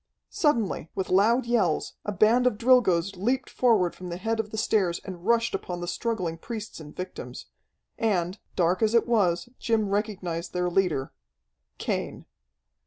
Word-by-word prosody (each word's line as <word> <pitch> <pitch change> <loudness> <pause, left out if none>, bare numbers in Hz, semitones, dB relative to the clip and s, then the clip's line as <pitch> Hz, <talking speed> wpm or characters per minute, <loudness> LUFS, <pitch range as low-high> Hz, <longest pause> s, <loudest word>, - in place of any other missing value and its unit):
Suddenly, 230 - 0
with 190 - -3
loud 225 +7 +4
yells, 235 -2 +1
a 210 - -1
band 220 +6 +4
of 215 - +1
Drilgoes 205 -7 +3
leaped 250 +7 -1
forward 215 -8 +3
from 180 -1 -8
the 170 - -4
head 225 +4 -2
of 215 -1 -2
the 220 - -6
stairs 195 -5 +1
and 185 -1 -8
rushed 230 -1 +3
upon 175 -1 -4
the 175 - -5
struggling 180 -5 -2
priests 215 -1 -6
and 150 -2 -11
victims. 185 - -7 0.5
And, 190 -4 0 0.2
dark 180 +1 +2
as 220 +1 +3
it 230 - +4
was, 185 -7 +2
Jim 220 -3 +1
recognized 190 -5 -2
their 180 0 0
leader 170 -8 0 0.6
Cain. - - -3
200 Hz, 160 wpm, -26 LUFS, 180-230 Hz, 0.6 s, loud